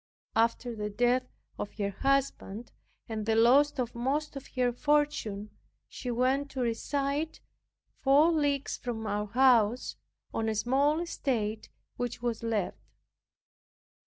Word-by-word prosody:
After 230 +1 +1
the 210 -1 -3
death 245 +4 +2 0.3
of 205 - -4
her 200 -2 -1
husband, 265 -3 -1 0.4
and 220 -2 -3
the 220 - +3
loss 275 +6 +5
of 245 -2 -2
most 280 +6 -1
of 275 0 -7
her 250 -1 +2
fortune, 270 -8 0 0.4
she 250 - -6
went 260 +4 +1
to 265 - -4
reside 280 +6 -1 0.6
four 285 +5 +5
leagues 290 -3 0
from 225 -3 -4
our 210 0 -1
house, 240 0 +3 0.4
on 225 0 0
a 220 - -1
small 275 +8 +2
estate, 225 -10 -2 0.3
which 245 -1 -3
was 235 -2 -2
left. 225 -4 -1
245 Hz, 130 wpm, -30 LUFS, 225-275 Hz, 0.6 s, loss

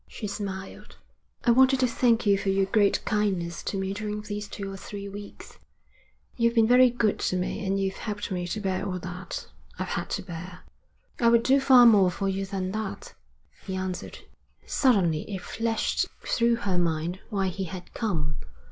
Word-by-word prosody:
She - - -7
smiled. 195 -2 -6 0.5
'I 240 - +6
wanted 260 +2 +5
to 255 - +4
thank 235 -1 +2
you 200 -1 +5
for 195 0 -2
your 195 0 +2
great 200 +1 +2
kindness 190 -5 -1
to 195 - -2
me 190 0 -2
during 210 +1 -4
these 205 0 -5
two 200 -1 -6
or - - -6
three 200 +1 -7
weeks. 200 +1 -10 0.8
You've 235 0 +2
been 225 -1 +5
very 250 +2 +6
good 230 -3 0
to - - 0
me, 180 +3 -2
and 195 0 0
you've 195 0 -1
helped 210 -2 -5
me 180 -1 -2
to 215 - -3
bear 190 -2 -1
all 190 -2 -2
that 180 +1 -6 0.3
I've - - -3
had - - -3
to - - -8
bear.' 180 +1 -8 0.6
'I 235 - +3
would 235 0 +4
do 270 +3 +4
far 260 -2 +7
more 205 -5 +6
for 195 +3 -3
you 195 0 -2
than 190 -1 -3
that,' 215 -1 -5 0.5
he 190 - -3
answered. 185 -1 -4 0.5
Suddenly 190 - +2
it 190 -2 -4
flashed 225 -1 -1 0.2
through 235 0 +2
her 185 -3 +1
mind 170 +1 -1
why 195 -4 0
he 190 +1 -4
had 180 +1 -9
come. 155 -10 -1
195 Hz, 185 wpm, -27 LUFS, 185-220 Hz, 0.8 s, far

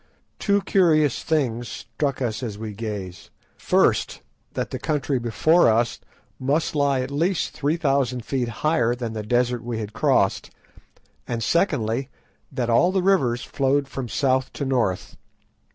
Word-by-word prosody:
Two 200 -1 +2
curious 155 -7 +3
things 120 -7 -1
struck 130 +5 -3
us 115 -1 -2
as 110 -5 -5
we 110 -1 -6
gazed. 100 -4 -6 0.3
First, - - +1 0.3
that - - -3
the - - -4
country 145 -3 -1
before 120 +7 +3
us 115 +1 +1 0.4
must 140 +5 0
lie 140 -3 +2
at 130 +2 -5
least 165 +5 0
three 150 +3 0
thousand 135 -6 0
feet 125 -1 -1 0.2
higher 120 -7 +2
than 120 -2 -5
the 110 - -3
desert 120 +2 0
we 120 -1 -3
had 105 -1 -5
crossed, - - +1 0.8
and 115 -2 -2
secondly, 130 - 0 0.4
that 130 -3 -2
all 140 +10 +4
the 190 -1 0
rivers 135 -12 +2
flowed 140 +1 0
from 130 -3 -5
south 130 +3 +1
to 140 - -3
north. 120 -9 -1
130 Hz, 150 wpm, -23 LUFS, 115-145 Hz, 0.8 s, all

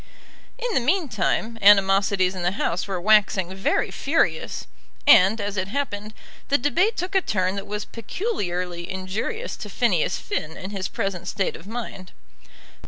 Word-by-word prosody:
In - - -2
the - - +3
meantime 235 - 0
animosities 195 -1 +5
in 185 - -5
the 175 +1 0
House 180 -2 -1
were 190 -2 -2
waxing 195 -2 +3
very 190 0 0
furious; 315 +4 0 0.4
and, 215 -5 +7
as 205 0 -3
it 185 0 -1
happened, 215 -4 -4 0.3
the 280 - +3
debate 345 - +1
took 365 +3 -3
a 385 - +4
turn 185 - 0
that 200 0 -5
was 210 0 -4
peculiarly 180 - -4
injurious 195 - -4
to - - -7
Phineas - - +1
Finn 160 - -4
in 190 +2 -7
his 195 -2 -3
present 195 -5 -3
state 195 -1 -1
of 180 - -12
mind. 215 -5 -7
200 Hz, 155 wpm, -24 LUFS, 185-260 Hz, 0.4 s, and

